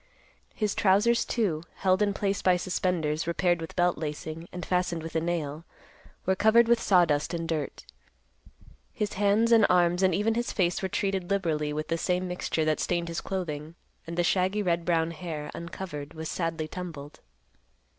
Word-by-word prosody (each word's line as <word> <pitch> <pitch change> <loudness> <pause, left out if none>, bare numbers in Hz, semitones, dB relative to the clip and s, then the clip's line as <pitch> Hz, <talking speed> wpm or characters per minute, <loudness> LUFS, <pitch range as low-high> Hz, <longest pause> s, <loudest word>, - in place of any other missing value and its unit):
His 210 -3 0
trousers, 210 +4 +3
too, 190 -10 0
held 185 0 +2
in 205 -1 +3
place 200 0 -1
by 180 -1 +4
suspenders 170 -4 -1
repaired 175 0 +1
with 165 - -7
belt 175 -2 +2
lacing 155 +2 -5
and 180 0 -6
fastened 180 -3 0
with 165 0 -7
a 160 - +2
nail, 160 -2 -2 0.6
were 190 - +2
covered 220 +4 +5
with 235 0 +3
sawdust 170 -4 +3
and 165 -1 -3
dirt. 155 -4 -3 1.1
His 210 -1 -2
hands 205 +3 +2
and 225 -2 +7
arms 175 0 +3
and 185 -3 +3
even 215 +4 +1
his 235 +1 -1
face 180 -3 +1
were 190 - -2
treated 195 -2 -1
liberally 160 -7 0
with 155 +1 -4
the 165 0 0
same 180 +1 0
mixture 180 -3 -1
that 155 -1 +1
stained 170 -1 -1
his 165 - -3
clothing; 160 -4 -4 0.3
and 170 +1 -6
the 175 - +3
shaggy 190 +4 +1
red 170 -2 0
brown 165 -1 +1
hair, 155 -3 -6
uncovered, 170 -3 -7
was 160 0 -5
sadly 165 -2 -2
tumbled. 160 -5 -8
175 Hz, 175 wpm, -28 LUFS, 160-190 Hz, 1.1 s, and